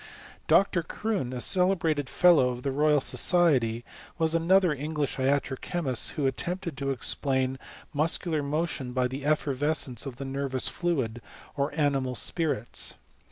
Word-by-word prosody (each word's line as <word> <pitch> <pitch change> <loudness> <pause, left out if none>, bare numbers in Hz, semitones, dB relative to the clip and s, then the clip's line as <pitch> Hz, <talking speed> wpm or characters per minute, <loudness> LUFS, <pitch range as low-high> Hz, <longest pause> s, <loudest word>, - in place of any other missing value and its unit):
Dr. 195 -3 +3
Croone, 185 - -3
a 125 - -4
celebrated 160 -2 +1
Fellow 170 -8 +4
of 125 0 -6
the 140 - -1
Royal 150 +1 +2
So - - -1
dety, 130 -11 +3 0.3
was 160 -1 +1
another 175 +1 +3
English 150 0 -3
iatro 135 0 0
chemist, 140 -9 0
who 145 - -2
attempt 175 +9 -2
ed 170 -5 -4
to 140 0 -2
explain 130 0 0 0.3
muscular 155 +1 +1
motion 145 -3 -3
by 125 0 +1
the 135 +2 -7
effervescence 145 -3 0
of 130 - -7
the 135 +2 -7
nervous 135 -1 -2
fluid, 130 -10 -2 0.3
or 140 +1 -1
animal 135 -3 0
spirits. 150 -6 0
145 Hz, 145 wpm, -27 LUFS, 130-165 Hz, 0.3 s, Fellow